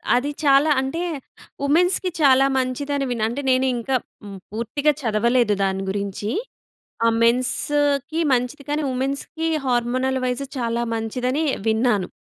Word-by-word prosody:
అది 255 +4 0
చాలా 280 +2 +5
అంటే 270 +6 -3 0.6
వుమెన్స్‌కి 355 +6 +2
చాలా 270 -1 +6
మంచిదని 275 +2 -1
విన్నా. 230 -3 -2
అంటే 265 +5 -4
నేను 255 +1 +3
ఇంకా 255 +3 -1 0.3
హ్మ్, 200 -1 -8
పూర్తిగా 235 +7 0
చదవలేదు 235 0 +2
దాని 195 0 -1
గురించి. 200 +1 -3 0.8
ఆ - - +5
మెన్స్‌కి 280 +5 +1
మంచిది 250 +4 -1
కానీ, 300 +1 0
వుమెన్స్‌కి 275 +5 -2 0.2
హార్మోనల్ 255 +2 0
వైస్ 250 +2 -2
చాలా 235 0 -1
మంచిదని 250 +7 -1 0.2
విన్నాను. 220 -4 +1
255 Hz, 125 wpm, -22 LUFS, 235-280 Hz, 0.8 s, చాలా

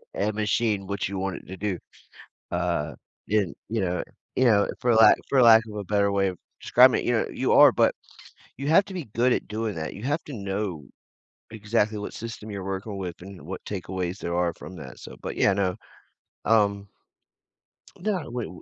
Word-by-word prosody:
a 105 +2 0
machine 105 -1 0
what 100 -1 -2
you 100 0 -4
want 95 -1 -2
it - - -12
to 95 - -8
do, 95 -2 -2 0.7
uh, 85 -4 -1 0.3
and, 100 -4 +1
you 110 +1 -1
know, 90 -2 -1 0.3
you 130 - +3
know, 105 -4 +4
for 120 -1 +3
lack 110 0 +7
for 130 -2 +4
lack 115 -1 +8
of 105 - -8
a 105 - -4
better 100 +1 +2
way 100 -1 +2
of 90 - -6 0.2
describing - - +5
it, - - -7
you - - +2
know, - - +1
you - - 0
are, - - +8
but - - +3 0.6
you 140 +2 -4
have 165 +6 +5
to 195 - -9
be 180 -5 -4
good 120 +2 +3
at - - -2
doing 110 0 -3
that, 80 -1 -4
you 105 - -10
have 145 +4 -1
to 145 - -8
know 100 - -4 0.7
exactly 110 0 0
what 105 - -6
system 115 -1 -7
you're 100 -2 -5
working 95 +2 -4
with 90 -3 -6
and 95 0 -10
what 90 +5 -7
takeaways 95 -1 -4
there 85 -4 -3
are 90 -1 +1
from 95 - -10
that, 70 -5 -10
so, - - -10
but - - -5
yeah 100 - +4
no, 95 -1 0 0.7
um 100 -2 +2 1.1
Yeah, 190 -4 -2
wait 120 -1 -4
wa 90 - -12
100 Hz, 205 wpm, -26 LUFS, 95-110 Hz, 1.1 s, lack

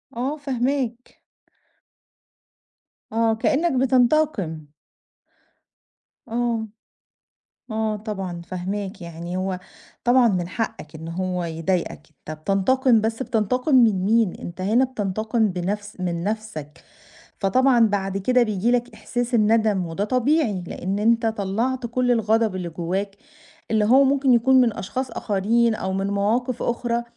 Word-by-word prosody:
آه 270 +6 -2
فاهماك. 255 -3 -2 1.9
آه، 225 0 +2
كأنك 275 +3 +1
بتنتقم. 245 - +1 1.6
آه، 230 -1 -1 1.0
آه 220 -1 -1
طبعًا 195 -5 -5
فاهماك 190 +2 -5
يعني 170 +1 -6
هو 185 -1 -2 0.5
طبعًا 245 -1 +5
من 180 -3 -1
حقك 220 -7 -5
إن 160 +1 -8
هو 180 0 -2
يضايقك 165 -1 -2
أنت 155 0 -10
بتنتقم 220 - +2
بس 225 +3 -2
بتنتقم 250 +5 0
من 215 -7 +4
مين؟ 220 -2 +2
أنت 175 +2 -8
هنا 225 +7 +3
بتنتقم 220 -1 -1
بنفس 195 +3 -4
من 170 -1 -2
نفسك 210 -9 -5 0.6
فطبعًا 245 +2 +4
بعد 195 -1 -1
كده 250 +5 +3
بييجي 215 +2 0
لك 245 -1 0
إحساس 245 +2 -4
الندم 215 -4 +3
وده 165 +5 -3
طبيعي 250 - +1
لإن 195 +3 -3
أنت 230 +2 +2
طلّعت 225 +4 -1
كل 245 +1 0
الغضب 225 -3 +2
اللي 175 -2 -4
جواك 185 +4 -3 0.6
اللي 215 -1 +3
هو 265 +5 +6
ممكن 270 -1 +3
يكون 260 +2 +5
من 230 -3 +2
أشخاص 255 +5 -4
آخرين 220 +3 +1
أو 190 -1 -3
من 195 +1 -1
مواقف 220 +5 0
أخرى، 235 0 -1
220 Hz, 125 wpm, -23 LUFS, 190-245 Hz, 1.9 s, هو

